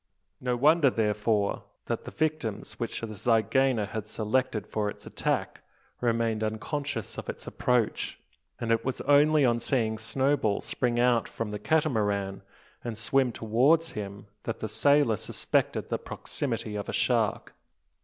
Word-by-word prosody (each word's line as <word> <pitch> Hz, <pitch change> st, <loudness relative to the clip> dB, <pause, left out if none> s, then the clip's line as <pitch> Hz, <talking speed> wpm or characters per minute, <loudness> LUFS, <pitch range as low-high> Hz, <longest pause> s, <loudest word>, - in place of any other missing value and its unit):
No 125 Hz, -1 st, 0 dB
wonder, 150 Hz, +2 st, +5 dB
therefore, 105 Hz, -2 st, 0 dB, 0.2 s
that -, -, -3 dB
the -, -, -5 dB
victims 150 Hz, -9 st, -2 dB
which 115 Hz, -, -3 dB
the 110 Hz, -2 st, -5 dB
zygaena 115 Hz, +2 st, +2 dB
had 110 Hz, -1 st, -4 dB
selected 110 Hz, -1 st, 0 dB
for 105 Hz, -1 st, -1 dB
its -, -, -9 dB
attack -, -, -2 dB, 0.4 s
remained 115 Hz, -2 st, +1 dB
unconscious 115 Hz, +3 st, -3 dB
of -, -, -7 dB
its -, -, -6 dB
approach; 125 Hz, -3 st, 0 dB, 0.4 s
and 115 Hz, -1 st, -1 dB
it 115 Hz, -, +2 dB
was 130 Hz, -, -2 dB
only 145 Hz, 0 st, +5 dB
on 120 Hz, -1 st, +3 dB
seeing 115 Hz, -3 st, 0 dB
Snowball 130 Hz, -2 st, +1 dB
spring 120 Hz, -2 st, -1 dB
out 120 Hz, -2 st, +3 dB
from 115 Hz, -2 st, -4 dB
the 105 Hz, -, -4 dB
Catamaran, 105 Hz, -9 st, +1 dB, 0.4 s
and 115 Hz, -3 st, -4 dB
swim 125 Hz, +3 st, +2 dB
towards 130 Hz, +10 st, +2 dB
him, 100 Hz, -1 st, -6 dB, 0.2 s
that 115 Hz, -, -2 dB
the 110 Hz, -, -4 dB
sailor 120 Hz, +1 st, +3 dB
suspected -, -, -1 dB
the -, -, -1 dB
proximity 115 Hz, -6 st, -4 dB
of 105 Hz, -, -4 dB
a -, -, -3 dB
shark. -, -, +1 dB
115 Hz, 145 wpm, -28 LUFS, 110-135 Hz, 0.4 s, wonder